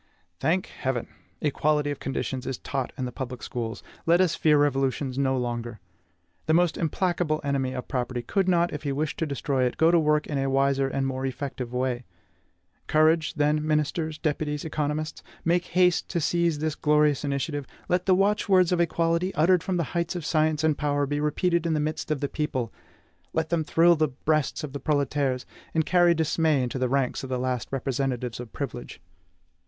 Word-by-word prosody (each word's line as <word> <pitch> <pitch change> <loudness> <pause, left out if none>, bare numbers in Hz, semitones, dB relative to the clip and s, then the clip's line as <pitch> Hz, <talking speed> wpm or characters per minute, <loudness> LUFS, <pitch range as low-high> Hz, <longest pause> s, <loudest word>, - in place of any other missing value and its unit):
Thank 170 +6 +1
Heaven! 130 -3 -3 0.3
equality 150 0 +1
of 145 - -5
conditions 135 -1 -3
is 130 - -2
taught 135 -3 -3
in 130 - -2
the 125 - -4
public 125 0 -6
schools; 115 -6 -4 0.2
let 170 +1 +5
us 180 -3 +3
fear 155 -3 +3
revolutions 135 -2 +1
no 135 -1 +2
longer. 120 -2 -3 0.7
The 160 - +4
most 175 -1 +3
implacable 165 -1 0
enemy 135 -2 -1
of 125 -1 -5
property 125 -1 -2
could 190 - 0
not, 175 -1 +2
if 150 - -4
he 145 - -2
wished 150 +2 -2
to 165 - 0
destroy 140 -2 -1
it, 125 - -2
go 160 +2 +5
to 170 - +5
work 150 -1 +2
in 145 -2 -2
a 135 0 0
wiser 135 0 +2
and 135 0 -1
more 130 0 -2
effective 130 -2 -5
way. 125 -1 -1 0.8
Courage, 155 +1 +3
then, 150 0 +2
ministers, 155 +1 0
deputies, 150 -1 -2
economists! 155 0 -2 0.2
make 175 +1 +2
haste 180 -1 +2
to 175 - -1
seize 170 0 +1
this 155 +1 -1
glorious 150 -2 +2
initiative; 140 0 -2 0.2
let 180 +1 0
the 185 - +6
watchwords 195 -2 +3
of 175 -1 +2
equality, 170 +2 +1
uttered 170 +4 +4
from 185 0 -1
the 170 - +1
heights 170 +1 -1
of 170 -4 -4
science 155 -1 +1
and 155 -2 +2
power, 145 -1 +1
be 145 +1 -2
repeated 170 +3 +1
in 160 - +1
the - - +1
midst 155 +2 -2
of 155 -3 -1
the 140 - 0
people; 130 -6 -3 0.6
let 160 -1 0
them 170 -2 +1
thrill 170 +2 +4
the 155 -1 +2
breasts 150 +2 -1
of 145 -3 -6
the 140 - -4
proletaires, 140 -3 0 0.3
and 160 -1 +2
carry 175 -1 +4
dismay 160 -3 +2
into 125 +1 -3
the 130 -1 +1
ranks 135 -1 0
of 135 - -6
the 130 - -1
last 125 -1 -2
representatives 130 -3 -2
of 120 -2 -8
privilege! 135 -4 -6
150 Hz, 190 wpm, -26 LUFS, 135-165 Hz, 0.8 s, the